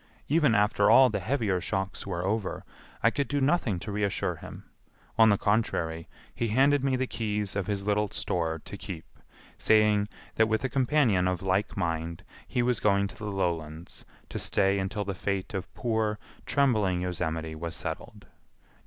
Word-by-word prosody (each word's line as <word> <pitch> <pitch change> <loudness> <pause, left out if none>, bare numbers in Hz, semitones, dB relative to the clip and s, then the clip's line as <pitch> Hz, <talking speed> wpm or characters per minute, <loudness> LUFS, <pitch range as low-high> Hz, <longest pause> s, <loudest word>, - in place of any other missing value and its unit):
Even 150 -5 +3
after 105 +1 +3
all 130 -2 +7
the 105 - -1
heavier 110 -5 0
shocks 95 0 -3
were 90 -2 -2
over 105 0 -2 0.4
I 115 - +5
could 140 +1 -1
do 145 - 0
nothing 135 - +1
to 105 - -5
reassure 100 -1 -1
him, - - -10 0.5
on 110 -1 +6
the 100 - +4
contrary, 85 -7 0 0.2
he 115 - -1
handed 135 +5 +3
me 135 -1 +2
the 130 +1 0
keys 105 -5 -2
of 100 -3 -2
his 100 -1 -2
little 105 0 +1
store 80 -3 -1
to - - -7
keep, - - -7 0.5
saying 105 -1 +4 0.2
that 110 - +3
with 110 +3 0
a 130 - 0
companion 125 -8 +2
of 90 0 -1
like 95 +2 0
mind 85 0 -2 0.2
he 120 - 0
was 125 -2 +2
going 100 -1 +2
to - - -12
the 105 -1 -5
lowlands 85 -3 -3 0.3
to - - -4
stay 100 0 +2
until 100 +2 -2
the 100 - -2
fate 95 +1 -3
of 95 -1 -4
poor, 110 -3 0 0.3
trembling 105 -10 +2
Yosemite 80 -3 -2
was 80 +1 -5
settled. - - -6
105 Hz, 170 wpm, -28 LUFS, 90-115 Hz, 0.5 s, all